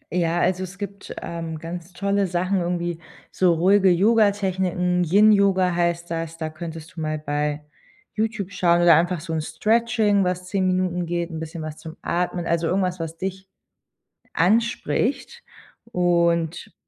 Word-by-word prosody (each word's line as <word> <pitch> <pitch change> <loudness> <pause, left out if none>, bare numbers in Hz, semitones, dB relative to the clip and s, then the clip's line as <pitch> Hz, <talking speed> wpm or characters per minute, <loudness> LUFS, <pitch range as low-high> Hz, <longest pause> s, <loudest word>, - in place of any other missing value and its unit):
Ja, 170 -1 +1
also 185 +1 +1
es 185 +1 -8
gibt, 200 0 -7
ähm, 165 -1 -5
ganz 170 +2 -7
tolle 200 +2 0
Sachen, 185 +2 0
irgendwie 175 -1 -2 0.3
so 185 -2 +3
ruhige 190 +3 +4
Yoga-Techniken, 190 -3 +2
Yin-Yoga 195 0 +4
heißt 170 0 -1
das, 165 0 -4
da 160 -1 -3
könntest 160 0 -8
du 160 - -6
mal 155 0 -2
bei 150 0 -2 0.5
YouTube 215 -3 -2
schauen 175 -2 +2
oder 170 -1 +7
einfach 175 +2 +2
so 165 -1 -5
'n 160 - 0
Stretching, 215 +3 +1
was 180 0 -2
10 190 -2 +1
Minuten 180 -1 0
geht, 170 0 -2
'n 160 - -5
bisschen 160 0 -6
was 155 -1 -6
zum 160 0 -10
Atmen, 175 0 -1
also 170 0 0
irgendwas, 185 -1 0
was 165 0 -5
dich 190 +1 -5 0.9
anspricht 235 - 0 0.5
und 170 -2 +1
175 Hz, 150 wpm, -23 LUFS, 165-195 Hz, 0.9 s, oder